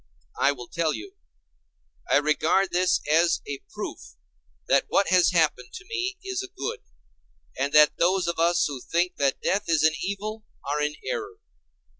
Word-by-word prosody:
I 140 Hz, -, +4 dB
will 125 Hz, -4 st, -8 dB
tell 165 Hz, -2 st, -1 dB
you. 380 Hz, +3 st, -9 dB, 1.0 s
I -, -, +5 dB
regard 155 Hz, +6 st, +2 dB
this 180 Hz, 0 st, +2 dB
as 165 Hz, +3 st, +3 dB
a 140 Hz, -1 st, -5 dB
proof -, -, -7 dB, 0.5 s
that 140 Hz, +1 st, +3 dB
what 200 Hz, -, +2 dB
has 185 Hz, -1 st, +5 dB
happened 155 Hz, -8 st, +1 dB
to 375 Hz, -, -9 dB
me 380 Hz, -4 st, -3 dB
is 385 Hz, -1 st, -2 dB
a 385 Hz, -, -7 dB
good, 380 Hz, +1 st, -5 dB, 0.8 s
and 140 Hz, +2 st, -1 dB
that 150 Hz, 0 st, +6 dB
those 180 Hz, +1 st, +2 dB
of 170 Hz, -1 st, -2 dB
us 170 Hz, +1 st, +3 dB
who 140 Hz, -4 st, -6 dB
think 175 Hz, +5 st, -1 dB
that 140 Hz, -1 st, 0 dB
death 195 Hz, -2 st, 0 dB
is 160 Hz, -2 st, +3 dB
an 160 Hz, 0 st, +4 dB
evil 210 Hz, +3 st, -4 dB, 0.2 s
are 150 Hz, +1 st, -1 dB
in 150 Hz, 0 st, -1 dB
error. 435 Hz, -4 st, -4 dB
170 Hz, 170 wpm, -25 LUFS, 150-200 Hz, 1.0 s, that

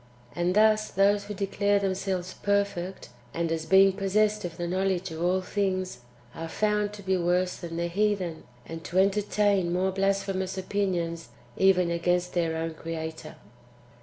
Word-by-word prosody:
And 175 Hz, +2 st, 0 dB
thus 215 Hz, 0 st, +4 dB
those 200 Hz, +1 st, +2 dB
who 205 Hz, 0 st, -6 dB
declare 200 Hz, +1 st, +1 dB
themselves 190 Hz, -2 st, -2 dB
" -, -, -26 dB
perfect," 200 Hz, -4 st, -1 dB, 0.3 s
and 170 Hz, -1 st, -1 dB
as 160 Hz, -1 st, -2 dB
being 190 Hz, +2 st, +6 dB
possessed 210 Hz, +2 st, +1 dB
of 170 Hz, -2 st, -6 dB
the 175 Hz, -, -3 dB
knowledge 190 Hz, 0 st, -1 dB
of 160 Hz, 0 st, -6 dB
all 180 Hz, +2 st, +2 dB
things, 185 Hz, -4 st, -2 dB, 0.3 s
are 165 Hz, 0 st, -6 dB
found 210 Hz, +2 st, 0 dB
to 205 Hz, -1 st, -10 dB
be 190 Hz, 0 st, +1 dB
worse 180 Hz, +1 st, +1 dB
than 165 Hz, -2 st, -6 dB
the 170 Hz, -, 0 dB
heathen, 185 Hz, -2 st, -1 dB, 0.2 s
and 165 Hz, 0 st, -8 dB
to 180 Hz, -, -3 dB
entertain 200 Hz, -1 st, +2 dB
more 185 Hz, +2 st, +1 dB
blasphemous 195 Hz, -1 st, -1 dB
opinions 180 Hz, -5 st, -2 dB, 0.3 s
even 185 Hz, -2 st, +3 dB
against 175 Hz, +1 st, 0 dB
their 165 Hz, -2 st, 0 dB
own 165 Hz, 0 st, -3 dB
Creator. 160 Hz, -1 st, -6 dB
185 Hz, 160 wpm, -27 LUFS, 170-200 Hz, 0.3 s, being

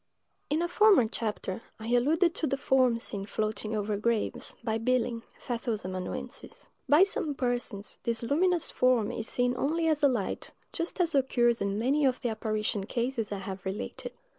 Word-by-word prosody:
IN 310 Hz, +4 st, +1 dB
a -, -, +1 dB
former 380 Hz, -, +5 dB
chapter, 215 Hz, -3 st, -3 dB, 0.2 s
I 220 Hz, +1 st, -6 dB
alluded 320 Hz, +8 st, +3 dB
to 315 Hz, -, -1 dB
the 275 Hz, -, 0 dB
forms 255 Hz, -4 st, +2 dB
seen 200 Hz, -1 st, -4 dB
floating 215 Hz, 0 st, -2 dB
over 210 Hz, 0 st, -1 dB
graves, 225 Hz, +1 st, -1 dB
by 225 Hz, -1 st, 0 dB
Billing, 240 Hz, 0 st, 0 dB, 0.2 s
Pfeffel's 230 Hz, -4 st, -3 dB
amanuensis. 185 Hz, -1 st, -6 dB, 0.2 s
By 300 Hz, +6 st, +7 dB
some 330 Hz, -7 st, -1 dB
persons, 245 Hz, -5 st, -2 dB
this 230 Hz, 0 st, -1 dB
luminous 340 Hz, +7 st, +2 dB
form 250 Hz, -4 st, +2 dB
is 225 Hz, -, -4 dB
seen 245 Hz, 0 st, +1 dB
only 325 Hz, +5 st, 0 dB
as 310 Hz, -1 st, +2 dB
a 285 Hz, -, +6 dB
light, 235 Hz, -8 st, -2 dB, 0.2 s
just 335 Hz, +3 st, -3 dB
as 340 Hz, -3 st, +2 dB
occurs 240 Hz, -4 st, +2 dB
in 200 Hz, 0 st, 0 dB
many 270 Hz, +7 st, +2 dB
of 255 Hz, -1 st, +2 dB
the 245 Hz, -, 0 dB
apparition 215 Hz, -2 st, -2 dB
cases 235 Hz, -3 st, -2 dB
I 200 Hz, -, -2 dB
have 190 Hz, -1 st, -6 dB
related. 190 Hz, +2 st, -5 dB
240 Hz, 170 wpm, -29 LUFS, 215-280 Hz, 0.2 s, By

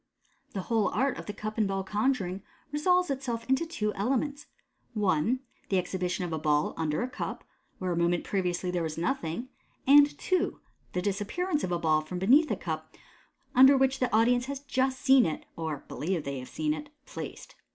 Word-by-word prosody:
The 195 Hz, -, -2 dB
whole 220 Hz, 0 st, +1 dB
art 270 Hz, +1 st, 0 dB
of -, -, -9 dB
cup 215 Hz, +2 st, -5 dB
and 215 Hz, -, +3 dB
ball 195 Hz, 0 st, -1 dB
conjuring 205 Hz, -2 st, 0 dB, 0.3 s
resolves 360 Hz, +3 st, +2 dB
itself 245 Hz, -4 st, -3 dB
into 265 Hz, +6 st, +2 dB
two 210 Hz, -10 st, -2 dB
elements 270 Hz, +7 st, -1 dB, 0.5 s
(1), 210 Hz, +5 st, +1 dB, 0.3 s
the 195 Hz, -, +2 dB
exhibition 180 Hz, 0 st, -1 dB
of 170 Hz, -, -4 dB
a 160 Hz, -, -1 dB
ball 150 Hz, -1 st, +1 dB
under 160 Hz, +5 st, -1 dB
a -, -, -1 dB
cup 255 Hz, -, -5 dB, 0.3 s
where 185 Hz, -1 st, -2 dB
a -, -, 0 dB
moment 170 Hz, 0 st, +1 dB
previously 180 Hz, -2 st, -1 dB
there 180 Hz, -1 st, -1 dB
was 160 Hz, -1 st, -3 dB
nothing 170 Hz, 0 st, -1 dB
j 255 Hz, -, -14 dB, 0.4 s
and 290 Hz, 0 st, +7 dB
(2) 370 Hz, 0 st, 0 dB, 0.3 s
the 180 Hz, -, -1 dB
disappearance 215 Hz, -, -1 dB
of 180 Hz, -, -2 dB
a 175 Hz, -, +1 dB
ball 155 Hz, -2 st, +2 dB
from 165 Hz, +4 st, -6 dB
beneath 265 Hz, -, +5 dB
a -, -, +1 dB
cup -, -, -5 dB, 0.6 s
under 265 Hz, +2 st, +8 dB
which 265 Hz, 0 st, +2 dB
the 255 Hz, -, +1 dB
audience 245 Hz, +3 st, +3 dB
have 280 Hz, 0 st, -5 dB
just 260 Hz, -1 st, 0 dB
seen 265 Hz, -2 st, +6 dB
it 160 Hz, -3 st, -2 dB
(or 160 Hz, -4 st, -4 dB
believe 170 Hz, 0 st, -2 dB
that -, -, -19 dB
they 140 Hz, -1 st, -3 dB
have 125 Hz, -, -9 dB
seen 305 Hz, -1 st, -1 dB
it) 295 Hz, -1 st, -7 dB, 0.2 s
placed. -, -, -8 dB
210 Hz, 195 wpm, -29 LUFS, 175-270 Hz, 0.6 s, under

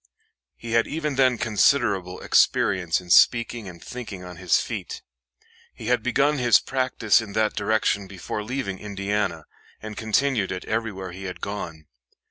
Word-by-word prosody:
He 115 Hz, -, -8 dB
had 115 Hz, 0 st, +3 dB
even 150 Hz, -1 st, -2 dB
then 130 Hz, -2 st, +3 dB
considerable 100 Hz, -5 st, +1 dB
experience 90 Hz, -5 st, +2 dB
in 90 Hz, -1 st, -8 dB
speaking 115 Hz, -2 st, +4 dB
and 85 Hz, -1 st, -12 dB
thinking 110 Hz, -7 st, -7 dB
on 90 Hz, -1 st, -9 dB
his 90 Hz, -2 st, +2 dB
feet. -, -, -5 dB, 0.7 s
He 110 Hz, -, -6 dB
had 125 Hz, -, +1 dB
begun 140 Hz, +4 st, +1 dB
his 120 Hz, -5 st, +5 dB
practice 130 Hz, -4 st, +1 dB
in 105 Hz, -3 st, -8 dB
that 110 Hz, 0 st, +1 dB
direction 105 Hz, -1 st, 0 dB
before 100 Hz, +2 st, -5 dB
leaving 110 Hz, -5 st, -4 dB
Indiana, 100 Hz, 0 st, -2 dB, 0.3 s
and 110 Hz, 0 st, -8 dB
continued 110 Hz, -1 st, 0 dB
it 90 Hz, -, -5 dB
everywhere 105 Hz, -5 st, -3 dB
he 95 Hz, +2 st, -8 dB
had 90 Hz, -2 st, -6 dB
gone. 85 Hz, -6 st, -6 dB
105 Hz, 150 wpm, -24 LUFS, 95-120 Hz, 0.7 s, his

